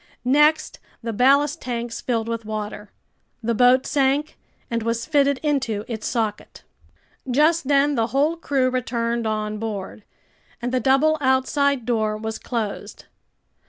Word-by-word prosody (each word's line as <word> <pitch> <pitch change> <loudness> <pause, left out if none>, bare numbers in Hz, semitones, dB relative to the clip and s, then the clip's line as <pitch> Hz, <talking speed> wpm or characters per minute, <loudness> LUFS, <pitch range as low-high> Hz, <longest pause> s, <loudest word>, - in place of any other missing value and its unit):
Next 300 +4 +3 0.2
the 230 -1 -3
ballast 280 +5 +3
tanks 235 -2 -4
filled 230 -3 -1
with 230 -1 -3
water, 210 -1 -6 0.5
the 235 +1 0
boat 250 +3 +4
sank, 280 +2 +1 0.3
and 230 0 -2
was 230 +1 -2
fitted 280 -3 +2
into 255 -8 -1
its 220 -3 -4
socket. 220 -4 -3 0.7
Just 300 +3 +2
then 285 +1 +3
the 225 -4 +1
whole 290 +6 +1
crew 275 -6 0
returned 235 -2 -1
on 215 -1 -2
board, 210 -2 -5 0.6
and 245 +1 -3
the 255 - +1
double 275 +5 +3
outside 265 0 +1
door 220 -3 0
was 220 +1 -5
closed. 225 -5 -5
245 Hz, 135 wpm, -22 LUFS, 225-280 Hz, 0.7 s, boat